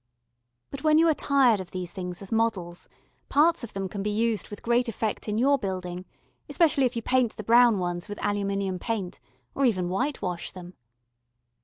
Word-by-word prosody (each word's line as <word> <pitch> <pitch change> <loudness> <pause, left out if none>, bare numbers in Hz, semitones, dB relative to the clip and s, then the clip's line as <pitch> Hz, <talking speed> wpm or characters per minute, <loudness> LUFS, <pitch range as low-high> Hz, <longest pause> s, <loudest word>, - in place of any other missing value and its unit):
But 275 0 -7
when 310 0 +5
you 330 +1 +5
are - - +4
tired 270 -7 +3
of 185 -2 -7
these 180 -2 -6
things 180 0 -6
as 195 - -10
models, 205 -7 -1 0.4
parts 315 0 +3
of 235 - -7
them 195 -1 -3
can 200 +1 -5
be 210 - -1
used 220 +1 0
with 205 - -9
great 240 +1 +2
effect 220 0 -3
in 210 - -1
your 275 +4 +3
building, 185 -3 -4 0.4
especially 305 -6 +3
if 245 - -1
you 230 - -3
paint 255 -2 +1
the 215 - -7
brown 235 0 +5
ones 175 +1 -3
with 205 - -5
aluminium 200 -2 -1
paint, 205 -5 -3 0.3
or 275 - -1
even 185 -8 +2
whitewash 190 -5 -2
them. 180 -1 -11
210 Hz, 185 wpm, -26 LUFS, 185-245 Hz, 0.4 s, when